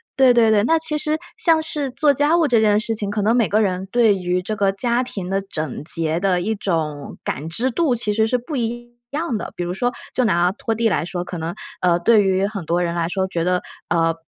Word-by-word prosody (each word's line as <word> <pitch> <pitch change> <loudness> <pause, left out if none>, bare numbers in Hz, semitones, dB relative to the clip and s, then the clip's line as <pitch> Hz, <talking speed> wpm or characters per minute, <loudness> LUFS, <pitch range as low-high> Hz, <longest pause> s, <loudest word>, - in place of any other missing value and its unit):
对 260 -2 +5
对 230 -2 +4
对， 210 -1 +3
那 325 +8 +3
其 315 -1 0
实 305 +1 -1 0.2
像 330 -7 +3
是 295 -3 -2
做 290 +3 +3
家 295 +5 +2
务 325 - +3
这 235 -4 +3
件 210 -1 +4
事 225 +1 -2
情， 205 -2 -2
可 205 +1 -1
能 220 +4 +2
每 235 -3 +2
个 215 +2 +2
人 190 -2 -1
对 230 -4 +4
于 180 -1 -1
这 215 +4 -4
个 200 -1 +2
家 235 +5 0
庭 195 -7 -6
的 195 +1 0
整 155 -8 -5
洁 160 0 +1
的 185 -1 +1
一 215 +5 -1
种 155 -8 -3
感 155 +3 -3
知 240 +10 0
度 285 +1 +1
其 225 -3 0
实 220 +1 +2
是 250 +3 +1
不 270 +6 -6
一 240 0 -4 0.2
样 295 -6 -2
的。 - - -6
比 175 - -3
如 175 +1 -3
说 245 +5 -1 0.2
就 255 - +2
拿 175 -4 +2
拖 225 +1 -3
地 225 0 +1
来 190 - 0
说， 175 0 -4
可 180 - -7
能， 165 +1 -4 0.3
呃， 175 -1 +3
对 215 +2 +4
于 190 0 +1
很 200 -5 -6
多 170 +3 0
人 170 -1 -1
来 170 -1 0
说， 190 +2 -1
觉 170 -3 -2
得， 180 +1 +1 0.3
呃， 165 -1 +2
210 Hz, 270 characters per minute, -21 LUFS, 180-240 Hz, 0.3 s, 对